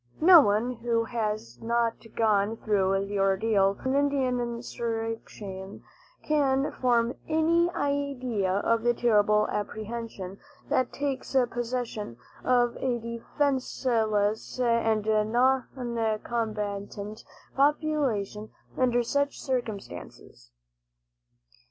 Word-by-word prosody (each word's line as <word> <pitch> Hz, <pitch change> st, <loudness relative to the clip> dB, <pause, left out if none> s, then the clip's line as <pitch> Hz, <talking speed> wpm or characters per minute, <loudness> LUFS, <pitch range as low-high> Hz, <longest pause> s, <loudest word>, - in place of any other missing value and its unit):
No 335 Hz, 0 st, +9 dB
one 215 Hz, +1 st, +1 dB
who 230 Hz, 0 st, 0 dB
has 215 Hz, -, -3 dB
not 230 Hz, 0 st, 0 dB
gone 215 Hz, -1 st, +2 dB
through 195 Hz, -2 st, +1 dB
the 200 Hz, 0 st, -3 dB
ordeal 195 Hz, +1 st, +3 dB
of -, -, -15 dB
an 260 Hz, -, +1 dB
Indian 275 Hz, -3 st, +1 dB
insurrection 225 Hz, -4 st, -5 dB, 0.4 s
can 280 Hz, -2 st, +1 dB
form 240 Hz, -1 st, +1 dB
any 330 Hz, +2 st, +3 dB
idea 275 Hz, -, -1 dB
of 225 Hz, +4 st, +1 dB
the 240 Hz, +1 st, +2 dB
terrible 210 Hz, -2 st, +3 dB
apprehension 210 Hz, -2 st, -5 dB, 0.3 s
that 255 Hz, -1 st, +1 dB
takes 275 Hz, -1 st, -3 dB, 0.2 s
possession 240 Hz, -, -4 dB, 0.3 s
of 245 Hz, -1 st, +2 dB
a 250 Hz, -2 st, 0 dB
defenseless 235 Hz, -3 st, -1 dB
and 230 Hz, -3 st, +2 dB
noncombatant 220 Hz, -3 st, -1 dB, 0.3 s
population 275 Hz, -8 st, 0 dB, 0.3 s
under 245 Hz, -2 st, +2 dB
such 285 Hz, +4 st, -1 dB
circumstances. 200 Hz, -, -5 dB
230 Hz, 90 wpm, -27 LUFS, 210-255 Hz, 0.4 s, No